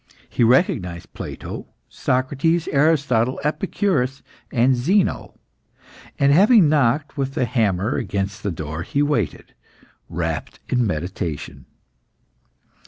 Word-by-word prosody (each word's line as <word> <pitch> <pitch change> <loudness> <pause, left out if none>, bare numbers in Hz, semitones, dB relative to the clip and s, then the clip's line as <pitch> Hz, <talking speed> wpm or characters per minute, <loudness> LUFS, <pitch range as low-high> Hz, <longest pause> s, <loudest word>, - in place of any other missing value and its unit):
He - - 0
recognised 105 - +1
Plato, - - -7 0.2
Socrates, 140 +6 0
Aristotle, 140 -5 +2
Epicurus, 150 - -1 0.3
and 125 +2 +3
Zeno, 180 +11 0 0.8
and 140 0 +4
having 200 - +6
knocked 145 0 +1
with 135 0 -2
the 130 - +1
hammer 105 -3 0
against 100 0 -3
the 100 - -2
door, 80 -2 -5
he 140 +11 0
waited, 120 - -2 0.6
wrapped - - -4
in 125 -2 +2
meditation. 85 -3 -4
130 Hz, 100 wpm, -21 LUFS, 100-150 Hz, 0.8 s, having